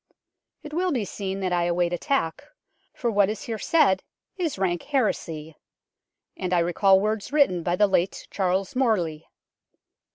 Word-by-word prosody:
It 300 - -9
will 360 +2 0
be 240 -8 -1
seen 195 0 -4
that 185 -1 -1
I 175 -1 +2
await 175 0 +1
attack, 175 - -1 0.5
for 240 -2 -2
what 200 -2 +3
is 215 - -4
here 225 -2 -4
said 280 - +3 0.3
is 335 - -2
rank 175 -3 0
heresy; 165 - -2 0.8
and 185 -1 -3
I - - +4
recall 185 +3 +4
words 215 +3 -2
written 280 - +3
by 175 +1 0
the 205 - +4
late 190 -2 0
Charles 190 +3 -1
Morley. 180 -12 0
195 Hz, 155 wpm, -25 LUFS, 175-235 Hz, 0.8 s, I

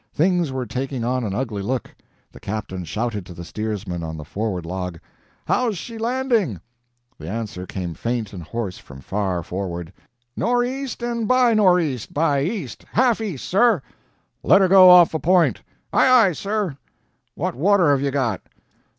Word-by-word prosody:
Things 175 -2 +2
were 130 -1 -3
taking 130 +2 -4
on 125 +1 0
an 100 -3 -3
ugly 110 -4 -3
look. 125 +5 -3 0.4
The - - -14
captain 95 -4 -5
shouted 105 +4 -3
to 90 - -10
the 85 +1 -8
steersman 105 -4 -4
on 80 -1 -5
the 75 - -8
forward 95 -1 -3
log: 90 -1 -5 0.5
"How's 235 -6 0
she 225 +6 -7
landing?" 230 - 0 0.6
The 80 +1 -7
answer 105 -4 -5
came 90 -3 -5
faint 115 +4 -3
and 90 - -7
hoarse 95 +2 -5
from 70 -1 -13
far 95 0 -2
forward: 90 -2 -5 0.4
"Nor' 245 +1 +1
east 260 0 -4
and 235 -2 -2
by 255 -1 +4
nor' 190 -5 +5
east 135 -9 -3
by 145 -2 +2
east, 165 - -4
half 240 -1 +3
east, 190 - -4
sir." 200 - +3 0.6
"Let 195 - +5
her 190 - +5
go 185 0 +8
off 180 -2 +8
a 160 - -1
point!" 180 +1 +3 0.3
"Aye - - +4
aye, 235 -7 +6
sir!" 195 -3 -2 0.6
"What - - -2
water 175 +3 +3
have 140 -2 +2
you 140 - 0
got?" 130 -7 -1
130 Hz, 170 wpm, -22 LUFS, -, 0.6 s, go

